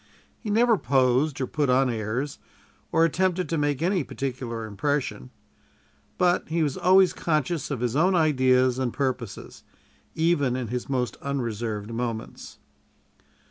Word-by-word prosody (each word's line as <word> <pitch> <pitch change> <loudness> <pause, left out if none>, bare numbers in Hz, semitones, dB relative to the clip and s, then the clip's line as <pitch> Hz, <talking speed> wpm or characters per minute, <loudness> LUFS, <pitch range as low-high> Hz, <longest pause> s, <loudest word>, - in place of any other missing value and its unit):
He 220 - -6
never 225 0 +3
posed, 130 +2 +2
or - - +1
put 145 +1 -1
on 130 +1 +4
airs, 120 +4 -3 0.5
or 165 - +4
attempted 180 +1 0
to 165 - 0
make 145 0 0
any 180 -2 +1
particular 125 -5 -4
impression; 110 - -2 0.9
but 180 -2 +2
he 165 0 +1
was 145 -3 -1
always 185 +1 +4
conscious 155 -1 -1
of 135 -5 -3
his 120 0 -1
own 180 +5 +3
ideas 130 -5 +3
and 130 -2 -1
purposes, 130 -5 -4 0.5
even 160 -6 +2
in 125 -3 -3
his 125 +2 -4
most 125 -3 -1
unreserved 115 -5 -3
moments. 115 -1 -5
135 Hz, 140 wpm, -25 LUFS, 125-160 Hz, 0.9 s, on